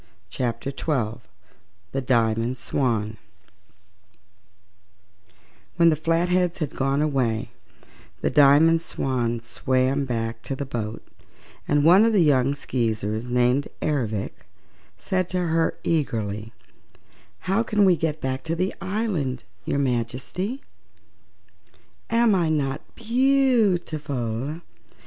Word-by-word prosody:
Chapter 125 +4 -2
Twelve 125 -7 -2 0.7
The 135 - -2
Diamond 115 -1 +1
Swan 115 -4 -1 2.6
When 170 -1 +5
the 160 - +3
Flatheads 170 +3 +1
had 155 -4 -4
gone 135 +2 +1
away 125 -7 0 0.7
the - - 0
Diamond 150 +3 +6
Swan 120 -7 -2
swam 130 +3 0
back 115 -2 -3
to 135 - -4
the 140 - -4
boat 115 -4 -5 0.6
and 145 0 +2
one 180 +5 +7
of 225 0 +3
the 195 -5 +5
young 140 -2 +3
Skeezers 110 -4 -2
named 125 +3 +2
Ervic 115 -9 -2 0.5
said 185 -1 -1
to 185 - -1
her 165 -2 +1
eagerly: 110 -9 -1 0.9
"How 195 +4 +1
can 210 -3 +2
we 185 -2 +5
get 160 -1 -2
back 130 0 -2
to 165 +1 -1
the 185 +3 -1
island, 190 - -2 0.2
your - - -1
Majesty?" 135 - -2 1.5
"Am 230 -1 +4
I 175 -4 +2
not 145 -2 -1
beautiful?" 175 - +1
140 Hz, 110 wpm, -24 LUFS, 120-170 Hz, 2.6 s, one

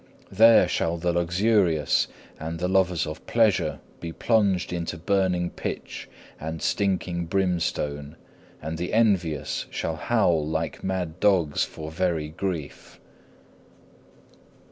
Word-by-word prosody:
There 110 -1 +6
shall 85 -1 0
the 85 +1 0
luxurious 85 -2 +2 0.3
and 80 +1 -4
the 90 +2 -1
lovers 90 -2 +2
of 75 0 -7
pleasure 110 -5 +2 0.2
be 85 - -5
plunged 100 -3 +1
into 85 0 -3
burning 90 0 0
pitch - - -6 0.3
and 80 +1 -5
stinking 90 -2 -1
brimstone, 80 -5 -1 0.5
and 80 +1 -4
the 90 - -3
envious 95 -9 +1
shall 80 -1 -3
howl 90 -10 +2
like 80 +2 -3
mad 90 -3 -3
dogs 90 -8 +3
for 80 0 -8
very 80 -3 -1
grief. 80 -3 -5
85 Hz, 115 wpm, -25 LUFS, 80-95 Hz, 0.5 s, There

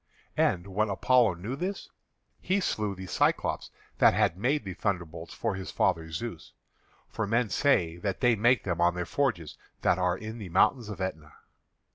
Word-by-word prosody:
And 85 0 +2
when 105 +2 0
Apollo 115 0 +3
knew 105 +9 -5
this, 185 +7 -4 0.5
he 190 +2 0
slew 105 - -1
the 95 0 -8
Cyclopés - - 0 0.3
that - - +6
had - - +2
made 130 +8 0
the 95 -2 -5
thunderbolts 85 -4 -3
for 115 -3 -2
his 95 0 -6
father 80 0 0
Zeus, 80 0 -6 0.5
for 110 - -3
men 115 +1 +1
say 85 - +2
that 95 +2 -3
they 120 -2 +4
make 120 +2 +3
them 90 -3 -2
on 85 0 +3
their 90 -1 -2
forges 95 - -1 0.2
that 90 - +3
are 90 0 +1
in 110 +3 -7
the 100 -4 -7
mountain 110 +6 +2
of 100 - -7
Etna. 80 -5 -5
100 Hz, 175 wpm, -28 LUFS, 90-115 Hz, 0.5 s, that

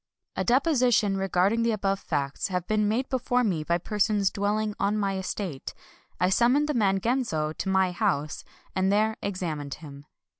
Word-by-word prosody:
A - - -1
deposition 245 -6 +3
regarding 195 +3 +1
the 230 0 +2
above 195 -2 -1
facts 140 -6 -2
hav 180 -2 -2
ing - - -44
been 215 -1 +1
made 240 +5 0
before 250 -1 0
me 175 -9 0
by 170 +2 +1
persons 205 +1 +1
dwelling 210 +1 -1
on 205 +2 +1
my 200 -2 0
estate, 190 -5 -5 0.4
I 180 +1 +2
summoned 250 +8 +3
the 300 - 0
man 195 -6 +2
Genzo 190 -10 -1
to 190 - -3
my 190 -1 +2
house, 175 -6 -1 0.3
and 190 +1 +2
there 215 +2 +2
examined 165 -8 -4
him. 145 -2 -12
200 Hz, 175 wpm, -27 LUFS, 180-220 Hz, 0.4 s, deposition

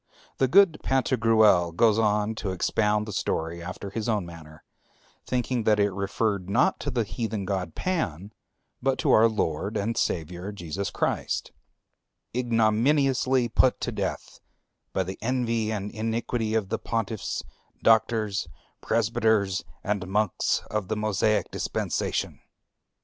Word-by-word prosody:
The 130 - +4
good 185 +1 +5
Pantagruel 110 -9 +3
goes 110 +3 +4
on 105 0 +1
to 110 -2 -4
expound 105 +3 +1
the 105 - -6
story 85 0 -2
after 95 +3 -7
his 110 +2 -3
own 105 -5 0
manner, 80 -2 -12 0.6
thinking 125 -1 0
that 105 -1 +4
it 100 0 +3
referred 100 0 -1
not 130 - +2
to - - -3
the 120 -4 0
heathen 110 -2 -3
god 95 -4 -3
Pan, 105 - -2 0.5
but 135 0 +1
to - - +1
our 115 +1 +6
Lord 100 0 -1
and 110 +3 -1
Savior, 90 +4 -2
Jesus 100 +1 -4
Christ, - - -2 0.8
"ignominiously 125 +2 +2
put 125 +2 +3
to - - -2
death - - -4 0.5
by 95 - 0
the 95 +1 -7
envy 115 -2 0
and 105 -1 -3
iniquity 115 0 -2
of 105 -4 0
the - - -1
pontiffs, 110 -2 -3 0.4
doctors, 110 -2 +2 0.3
presbyters, 110 -3 +1 0.2
and 100 -2 -2
monks 105 0 0
of 105 -3 -2
the 110 - -1
Mosaic 110 0 +1
dispensation...." - - -2
110 Hz, 135 wpm, -26 LUFS, 100-115 Hz, 0.8 s, our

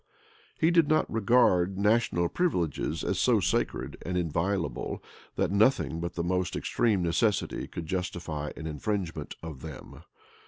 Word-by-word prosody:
He 165 +1 +4
did 165 -3 +4
not 155 +1 +3
regard 100 -5 +3
national 105 -4 +2
privileges 85 - -1
as - - -1
so - - +4
sacred - - -1
and 90 +1 -2
inviolable, 85 -3 -1 0.3
that - - 0
nothing 105 -4 +3
but 85 0 -4
the 85 - -1
most 90 +1 0
extreme 105 -6 +1
necessity 100 +5 0
could 85 - -6
justify 85 -4 -3
an 80 - -7
infringement 80 0 -3
of 75 -5 -7
them. 80 -4 -9
90 Hz, 135 wpm, -28 LUFS, 80-105 Hz, 0.3 s, He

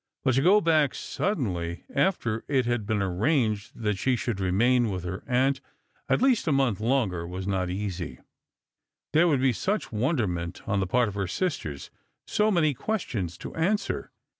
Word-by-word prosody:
But 130 - +3
to 135 - +3
go 195 +7 +5
back 155 -5 +3
suddenly, 90 - -2
after 140 - +1
it 135 -4 +2
had 120 -4 -1
been 105 -2 +1
arranged 110 - 0
that 105 -4 -1
she 130 +4 +2
should 120 -4 -2
remain 115 +6 +3
with 90 -3 -3
her 90 +1 -5
aunt 130 +2 +2 0.5
at - - +2
least 255 -9 +3
a - - +3
month 135 -8 +2
longer, 110 -8 0
was 90 +1 -5
not 95 -2 -1
easy. 95 -3 -4 1.0
There 165 +3 +5
would 140 -6 +2
be 130 -2 +3
such 205 - -2
wonderment 110 - -1
on 100 -3 +1
the 95 - 0
part 120 +5 +2
of 105 - -4
her 100 -1 -2
sisters, 90 - -3 0.3
so 215 +1 +2
many 165 -7 +3
questions 115 - -3
to - - -8
answer. 195 +6 -1
120 Hz, 170 wpm, -27 LUFS, 95-145 Hz, 1.0 s, go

